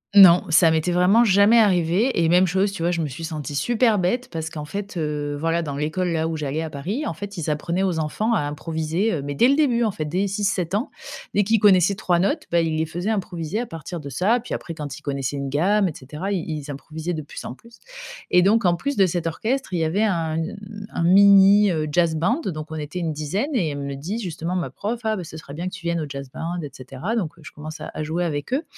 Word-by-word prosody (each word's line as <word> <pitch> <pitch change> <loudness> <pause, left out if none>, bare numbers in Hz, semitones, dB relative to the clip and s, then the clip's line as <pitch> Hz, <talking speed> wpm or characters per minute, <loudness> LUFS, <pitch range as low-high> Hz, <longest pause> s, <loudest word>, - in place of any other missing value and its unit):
Non, 180 -3 +9
ça 165 +1 +5
m'était 160 +2 +1
vraiment 180 +6 +4
jamais 205 +2 +5
arrivé 190 +3 +2
et 160 - +2
même 180 +2 +5
chose, 190 +3 +1
tu 195 -4 -7
vois? 170 - +1
Je 175 -1 -1
me 155 - -1
suis 145 +4 -8
sentie 155 -3 -5
super 225 - +2
bête 240 +8 0
parce 160 -1 -4
qu'en 150 -2 -6
fait, 200 +4 -6
heu, 150 -2 -2
voilà 165 +2 0
dans 145 -4 -4
l'école 155 +5 -1
là 160 0 0
où 165 - -3
j'allais 150 +1 -2
à 160 - -6
Paris 195 - -3
en - - -2
fait 200 +3 -8
ils 155 -2 -2
apprenaient 170 +5 -1
aux 180 -4 0
enfants 210 +9 -1
à - - +2
improviser, 160 +6 -2
heu, 155 - -2
mais 145 0 -4
dès 235 - +5
le 275 - +4
début 250 -6 +2
en 220 - +1
fait 155 -5 -4
dès 180 +6 0
6-7 195 -3 -1
ans. 215 +7 0 0.5
Dès 205 - +4
qu'ils 225 +2 +2
connaissaient 195 -2 +5
3 180 -2 0
notes, 285 - 0
bah, 170 - +3
ils 165 -1 0
les 160 0 0
faisaient 175 +7 -3
improviser 180 -2 -3
à 240 - -3
partir 165 0 -7
de 140 - -8
ça. 195 - +2
Puis 245 - -5
après 165 - -6
quand 145 -4 -6
ils - - -14
connaissaient 140 -1 -2
une 140 - -3
gamme 190 +8 +2
et 160 - -4
cetera, 150 +10 -6
i 185 -4 -1
ils 150 -3 -5
improvisaient 160 +4 -5
de 160 - -3
plus 145 - -9
en - - -5
plus. 230 - -18 0.5
Et 180 - +6
donc 205 +4 +3
en 175 -1 +4
plus 280 +10 -3
de 195 - +6
cet 170 -1 -2
orchestre, 225 - -2
il - - +1
y - - +1
avait 165 +6 0
un 165 -6 0
u - - +1
une 205 +4 -7
un - - -2
mini, 200 +2 +7
heu, 155 -3 -1
jazz 170 0 +2
band, 195 - +1
donc 155 -3 -5
on - - -4
était 150 +3 -6
une 165 -3 -1
dizaine 190 - -2
et 190 - +1
elle 145 - -4
me 140 0 -4
dit, 170 +11 -4
justement, 180 -4 -4
ma 175 - -2
prof: 225 +3 -4
«Ah 220 -1 0
beh 185 - -5
ce 160 -1 -9
serait 140 -3 -10
bien 170 +5 -4
que 185 - -6
tu 185 - -8
viennes 170 0 0
au 155 - -3
jazz 140 -1 -7
band, 170 +4 -4
et 145 - -5
cetera». 135 - -5
Donc 185 -9 -2
je - - -10
commence 155 +1 -9
à - - -7
à 155 - -4
jouer 165 +3 -1
avec 145 - -3
eux. 285 +5 +1
175 Hz, 265 wpm, -23 LUFS, 155-200 Hz, 0.5 s, Non